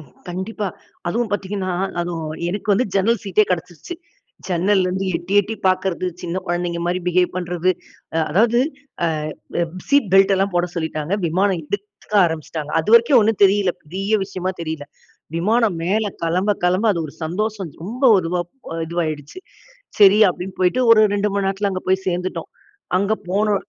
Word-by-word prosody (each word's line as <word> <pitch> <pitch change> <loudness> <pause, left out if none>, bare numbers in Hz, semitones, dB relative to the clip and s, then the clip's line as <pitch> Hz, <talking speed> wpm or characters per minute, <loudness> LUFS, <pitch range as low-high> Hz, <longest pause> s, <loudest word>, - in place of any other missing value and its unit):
ம்ஹ் 145 -5 -16 0.2
கண்டிப்பா. 195 +4 -4 0.4
அதுவும் 230 +3 -1
பார்த்தீங்கனா 195 -1 -2 0.3
அதுவும் 165 -3 -4 0.2
எனக்கு 205 +4 -5
வந்து 225 +6 +2
ஜன்னல் 205 +3 +2
சீட்டே 200 +2 +3
கிடைச்சுடுச்சு. 175 - -4 0.5
ஜன்னல்லெருந்து 185 +1 +1
எட்டி 175 +4 -4
எட்டி 215 +3 -5
பார்க்கிறது, 185 -1 +1 0.2
சின்ன 175 +2 -3
குழந்தைங்க 175 0 -1
மாரி 180 +1 0
பிஹேவ் 180 0 +2
பண்றது. 180 0 0 0.4
அ 165 - +1
அதாவது 230 +7 +3 0.5
அ 170 - +3 0.5
ப - - -1 0.3
சீட் 280 -8 +3
பெல்ட் 195 +1 +6
எல்லாம் 195 0 0
போட 175 0 +1
சொல்லிட்டாங்க. 160 0 -3
விமானம் 185 +2 +1
எடுக்க 205 +3 -6
ஆரம்பிச்சுட்டாங்க. 155 -2 -4
அது 160 - -8
வரைக்கும் 235 +3 +6
ஒன்னும் 215 -1 +1
தெரியல்ல. 195 -1 +3
பெரிய 195 +7 -4
விஷயமா 185 -1 -3
தெரியல்ல. 160 -3 -5 0.5
விமானம் 215 +2 +2
மேல 210 +4 +1 0.2
கிளம்ப 180 +5 +1
கிளம்ப 185 +5 +2
அது 170 - -2
ஒரு 140 - -12
சந்தோஷம் 200 +1 -3
ரொம்ப 240 +7 -7 0.2
இதுவா 175 +1 -1 0.3
அ 165 - -4
இதுவாயிடுச்சு. 155 - -3 0.6
சரி 205 0 +7
அப்படின்னு 185 +2 -7
போய்ட்டு 185 +8 +2
ஒரு 225 - +8
2 205 +1 +1
மணி 200 -1 0
நேரத்துல 195 +1 0
அங்கு 185 - -5
போய் 190 0 +1
சேர்ந்துட்டோம். 180 +1 -3 0.5
அங்கு 200 +3 +1 0.2
போனோ 210 +2 +2
185 Hz, 155 wpm, -20 LUFS, 175-205 Hz, 0.6 s, ஒரு